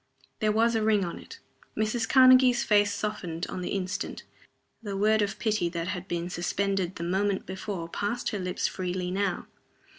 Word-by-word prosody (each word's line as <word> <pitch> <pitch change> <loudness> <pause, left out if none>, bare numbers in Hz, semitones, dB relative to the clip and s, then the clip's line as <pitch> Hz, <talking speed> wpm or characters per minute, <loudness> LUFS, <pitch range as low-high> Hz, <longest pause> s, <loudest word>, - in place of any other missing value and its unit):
There 215 -1 +2
was 230 +2 +3
a 225 - +1
ring 215 -3 +2
on 170 - -6
it. 460 - -12 0.4
Mrs. 220 +1 0
Karnegie's 255 -2 +6
face 205 -1 +3
softened 180 -6 -3
on 185 - -5
the 180 - -3
instant: 195 +1 -3 0.6
the 200 -3 -4
word 215 +2 +3
of 205 -1 -1
pity 210 -6 0
that 170 +1 -4
had 185 -1 -4
been 170 -1 -2
suspended 190 +1 -1
the 170 - -5
moment 190 +3 0
before 190 -2 -5
passed 205 +7 -2
her 210 - -3
lips 180 -1 -1
freely 180 -1 -3
now. 195 -1 -1
200 Hz, 175 wpm, -28 LUFS, 180-215 Hz, 0.6 s, Karnegie's